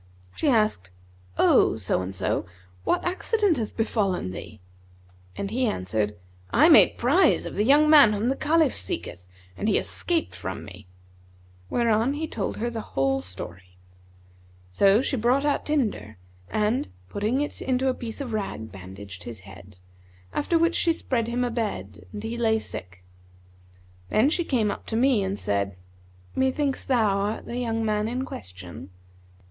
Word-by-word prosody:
She 300 - +1
asked, 215 - +2 0.5
'O - - +4
so - - -1
and 95 +1 -5
so, 95 - -1 0.4
what - - +1
accident 375 - +1
hath 220 -3 -4
befallen 200 - 0
thee?'; 110 +3 -9 0.8
and 200 0 -3
he 250 +2 +1
answered, 105 - -1 0.4
'I - - +6
made - - +7
prize 80 - +3
of - - -6
the 205 - +1
young 290 +6 +5
man 290 -7 +8
whom 210 +3 -1
the 265 - +1
Caliph 310 -2 +2
seeketh 90 0 -5 0.3
and 210 - -1
he 205 - +3
escaped 340 -2 0
from - - -6
me;' - - -12 0.8
whereupon 235 +2 +2
he 315 +2 -3
told 215 -9 -3
her 235 +2 -2
the 225 -1 -4 0.2
whole 135 0 +2
story. 90 -1 -9 0.9
So 200 - +4
she 270 - -1
brought 250 +5 +2
out 290 - 0
tinder[FN#155] 245 - -1 0.3
and, 215 +3 0 0.2
putting 215 - -1
it 295 - -4
into 260 0 0
a 260 - +2
piece 235 -1 -6
of 250 -5 -5
rag 195 - -4
bandaged 95 0 -10
his 115 -5 -8
head; 95 0 -14 0.6
after 335 - +1
which 335 +1 +3
she 335 -1 +2
spread 235 -7 -2
him 245 +1 -1
a 245 - -1
bed 105 - -4
and 210 0 -7
he 230 +2 -4
lay 220 -1 +3
sick. 90 - -7 1.1
Then 250 +8 +3
she 345 0 0
came 225 -8 +1
up - - -8
to 225 - -3
me 240 -3 +3
and 195 +1 -2
said, 100 - -1 0.6
'Methinks 265 +1 0
thou 245 -4 +2
art 205 +2 -2
the 245 0 -3
man 215 -1 0
in 250 +3 -2
question?' 90 - -9
220 Hz, 160 wpm, -25 LUFS, -, 1.1 s, man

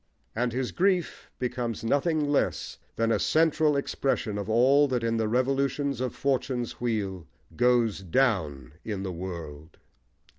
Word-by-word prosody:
And 120 +2 0
his 125 +1 -2
grief 185 -2 0
becomes 120 -3 -3
nothing 150 +5 +1
less 145 -1 -1 0.2
than 115 0 +1
a - - +2
central 155 -2 +3
expression 130 -6 -1
of 100 +1 -5
all 135 +6 +5
that 125 -3 -1
in 115 0 0
the 110 -1 0
revolutions 135 +2 0
of 130 - -2
Fortune's 130 -3 -2
wheel 100 -7 -2 0.3
goes 120 -4 +2
down 85 - 0
in 100 -3 -4
the 95 - -3
world. 85 -4 -7
120 Hz, 140 wpm, -27 LUFS, 105-140 Hz, 0.3 s, all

